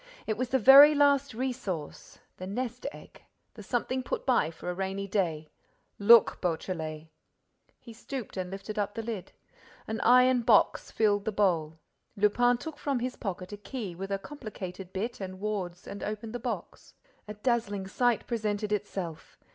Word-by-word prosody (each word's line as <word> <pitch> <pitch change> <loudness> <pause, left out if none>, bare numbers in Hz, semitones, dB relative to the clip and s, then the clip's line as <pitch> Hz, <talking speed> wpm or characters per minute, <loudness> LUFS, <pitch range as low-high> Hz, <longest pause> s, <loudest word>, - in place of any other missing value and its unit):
It 215 - -1
was 250 +2 -2
the 265 - +3
very 275 +5 +9
last 280 -3 +3
resource, 230 - -4 0.2
the 185 - -7
nest 245 +5 -4
egg, - - -14 0.3
the 215 - -11
something 245 +4 -1
put - - -4
by 245 - +3
for 165 - -10
a 180 - -1
rainy 195 +2 -3
day. 165 -6 -1 0.5
Look, 225 +2 +6
Beautrelet!" 160 -3 -3 0.7
He 230 - -12
stooped 250 +1 -7
and 185 -1 -3
lifted 200 +3 -6
up 205 0 -2
the 225 - -4
lid. 220 -5 -5 0.5
An 220 +1 -4
iron 250 +1 +5
box 230 -3 +3
filled 205 -2 +1
the 220 - 0
bowl. 170 -6 +1 0.4
Lupin 240 +4 +3
took 315 +3 -8
from 280 -3 -1
his 250 +1 -3
pocket 185 -2 -5
a - - -6
key 205 -3 -6
with 195 +3 -6
a 195 - 0
complicated 195 -7 -8
bit 215 +4 -4
and 185 -1 -6
wards 190 -4 -4
and 200 - -7
opened 215 +2 -5
the 245 - -3
box. 245 +1 -6 0.3
A 210 - -7
dazzling 210 -3 -1
sight 240 +4 +1
presented 210 -2 -2
itself. 190 -6 -4
210 Hz, 165 wpm, -29 LUFS, 190-245 Hz, 0.7 s, very